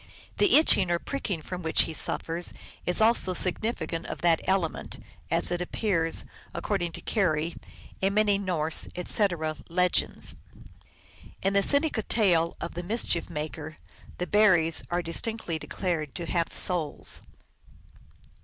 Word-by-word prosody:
The 410 - +5
itching 200 - +5
or 175 - +2
pricking 195 - -4
from 180 +2 -6
which 160 -1 +3
he 160 - -5
suffers 165 +2 -1 0.3
is 180 +4 +3
also 220 -5 +3
significant 185 -2 -1
of - - -6
that 170 -2 +3
element, 190 -4 -1 0.3
as - - +2
appears, 175 -1 0 0.3
according 175 -5 -2
to - - -7
Keary, 170 -6 0 0.5
in 195 +1 +1
many 210 -2 +3
Norse, 165 -5 +1
etc., 175 -4 -1
legends. 180 +1 +1 1.1
In 195 +1 +1
the 200 - +4
Seneca 285 +1 +3
tale 175 -7 +2
of 170 - -5
the 175 - -4
Mischief 180 -2 -2
Maker, 155 0 -6 0.4
the 180 - -2
Ber 210 0 +5
ries 165 -1 +2
are 175 0 -1
distinctly 170 0 -2
declared 160 -7 -3
to 170 - -4
have 170 0 -1
souls. 170 -5 -1
175 Hz, 135 wpm, -27 LUFS, 165-200 Hz, 1.1 s, The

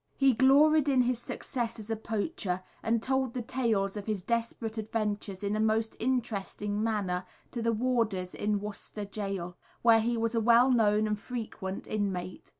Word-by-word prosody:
He 270 -1 +5
gloried 285 +4 +5
in 260 -2 +4
his 245 -1 0
success 240 -1 -4
as 220 0 -7
a - - +1
poacher, 215 - -3 0.2
and 225 0 0
told 265 -2 0
the 245 - -2
tales 225 -6 0
of 205 0 -6
his 210 -4 -2
desperate 230 0 -2
adventures 210 -2 -3
in 205 +1 0
a - - -1
most 220 +1 +1
interesting 210 -4 -1
manner 195 -5 0 0.3
to 235 - -3
the 230 0 +2
warders 225 -6 0
in 205 0 0
Worcester 210 0 -6
Gaol, 195 -4 -4 0.3
where 230 -1 +7
he 235 +1 0
was 230 0 0
a 230 - +2
well 235 +3 +6
known 215 -3 +3
and 210 -1 -1
frequent 215 -5 -5
inmate. 190 -4 -3
220 Hz, 170 wpm, -30 LUFS, 205-240 Hz, 0.3 s, where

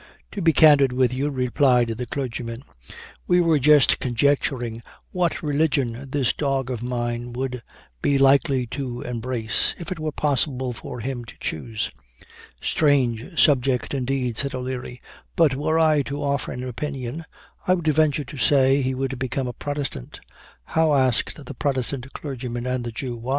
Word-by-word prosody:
"To 205 - -5
be 165 -2 +5
candid 145 -4 +6
with 125 -1 +2
you," 140 +3 -1
replied 125 -2 +2
the 115 +2 -4
clergyman, 120 -2 -4 0.6
"we 180 - +4
were 165 -3 +3
just 150 +1 +5
conjecturing 120 -2 0 0.3
what 175 -2 -1
religion 140 -4 0
this 135 -3 +1
dog 135 -3 -1
of 120 -3 -4
mine 120 -1 -3
would 125 -1 -3 0.4
be 140 - +2
likely 135 -1 +4
to 125 -3 -4
embrace, 120 -2 -1
if 175 +2 -7
it 180 - -4
were 155 0 -2
possible 130 -3 0
for 120 +1 -7
him 125 0 -4
to 115 - -12
choose." 110 +7 -3 0.7
"Strange 140 0 +1
subject, 135 -3 +3
indeed," 130 -3 -1
said 140 -1 0
O'Leary; 125 -1 -5 0.3
"but 160 -5 +4
were 155 +4 0
I 155 -2 +4
to 140 +1 -4
offer 140 -1 -1
an 125 - -5
opinion, 135 +3 -5 0.4
I 185 - +5
would 175 -3 -5
venture 155 -1 +2
to 140 +2 -10
say 135 +1 +4
he 130 0 -1
would 135 -1 -3
become 130 0 -2
a 125 - -4
Protestant!" 145 - -5 0.4
"How," 160 - +2
asked 130 +2 +1
the 140 - -7
Protestant 135 -1 -2
clergyman 125 -4 -5
and 125 -1 -1
the 120 - -4
Jew. 120 -1 -5
135 Hz, 155 wpm, -23 LUFS, 125-145 Hz, 0.7 s, candid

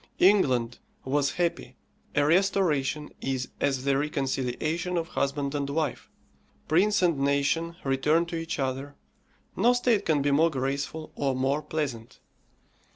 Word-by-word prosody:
England 130 - +3 0.3
was 140 +1 +1
happy; 175 -1 -2 0.4
a 145 - +3
restoration 155 -4 +1
is 130 -1 -2
as 135 -2 0
the 140 0 +2
reconciliation 150 +5 -1
of 165 0 -2
husband 140 0 -1
and 140 -1 -2
wife, 150 -1 -2 0.6
prince 195 +6 +3
and 170 -5 +2
nation 140 +4 +1
return 150 +5 +2
to 170 - -6
each 165 0 -3
other, 135 +1 -3 0.6
no 235 +6 +4
state 245 -4 +2
can 150 -6 +1
be 145 - +2
more 160 +4 +4
graceful 140 +3 -3
or 135 -2 0
more 135 +3 0
pleasant. 145 -7 -4
145 Hz, 135 wpm, -27 LUFS, 135-165 Hz, 0.6 s, no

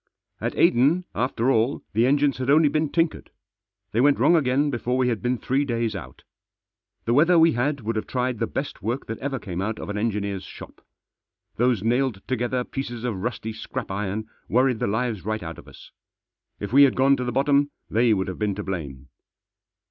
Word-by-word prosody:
At - - -3
Aden, 145 +10 +4
after 125 +1 0
all, 120 +4 +1
the 115 +4 +3
engines 140 -1 +2
had 130 +1 -2
only 150 +1 +5
been 155 +1 0
tinkered. 165 0 -1 0.6
They 115 - +1
went 145 +1 +4
wrong 150 +8 +4
again 145 -1 +2
before 125 0 -1
we 130 -1 +2
had 115 -3 -2
been 125 0 0
three 135 +4 0
days 115 -4 -1
out. 95 - -9 0.8
The 115 - +1
weather 170 +6 +5
we 165 0 +6
had 140 +2 -1
would 115 +1 -3
have 110 - -3
tried 125 -2 -1
the - - 0
best - - -5
work 120 +7 -2
that 115 - -6
ever 135 0 -3
came 95 -6 -5
out 110 +3 -2
of - - -7
an 105 0 -2
engineer's 100 -3 -2
shop. - - -12 0.7
Those 120 -4 +2
nailed 120 -3 0
together 125 0 -1
pieces 120 -3 -5
of 110 -7 -3
rusty 110 -1 -3
scrap 110 +1 -6
iron 105 +2 -3 0.2
worried 125 -1 +2
the - - 0
lives 110 -1 -1
right 110 0 -3
out 80 0 -7
of - - -15
us. - - -14 0.7
If 100 +3 -5
we 140 - +7
had 140 -3 +6
gone 135 +1 +4
to 125 - -2
the 125 - -2
bottom 140 +3 +2 0.2
they 115 +1 +2
would 95 -3 +1
have 95 - -6
been 105 -2 0
to 105 - -5
blame. 70 -9 -6
120 Hz, 200 wpm, -24 LUFS, 110-135 Hz, 0.8 s, we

